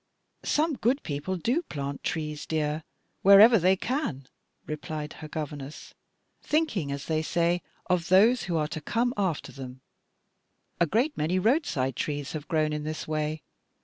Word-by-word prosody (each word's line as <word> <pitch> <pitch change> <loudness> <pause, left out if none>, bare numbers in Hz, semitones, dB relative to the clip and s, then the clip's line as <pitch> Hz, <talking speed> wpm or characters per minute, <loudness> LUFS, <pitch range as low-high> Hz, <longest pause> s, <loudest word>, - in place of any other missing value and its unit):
"Some 305 -2 +1
good 255 +6 +1
people 155 +5 -3
do 245 - +1
plant 140 - -5
trees, 150 -2 -3
dear, 155 0 -1 0.4
wherever 205 +4 +8
they 185 +2 +4
can," 190 - -2 0.4
replied 150 0 -5
her 155 - -6
governess, 150 -2 -6 0.5
"thinking, 235 - 0
as 140 0 -4
they 155 -1 0
say, 170 +2 +1 0.2
of 180 -2 0
those 220 +7 +5
who 170 -3 -1
are 150 -1 +1
to 155 -1 -5
come 235 +9 0
after 190 -6 -1
them; 130 -1 -9 1.0
a 170 - +4
great 245 - +1
many 160 +5 0
roadside 185 - +1
trees 145 -2 -3
have 155 -1 -6
grown 155 -2 +1
in 150 0 -3
this 155 +1 -4
way. 155 0 -2
160 Hz, 150 wpm, -27 LUFS, 150-205 Hz, 1.0 s, wherever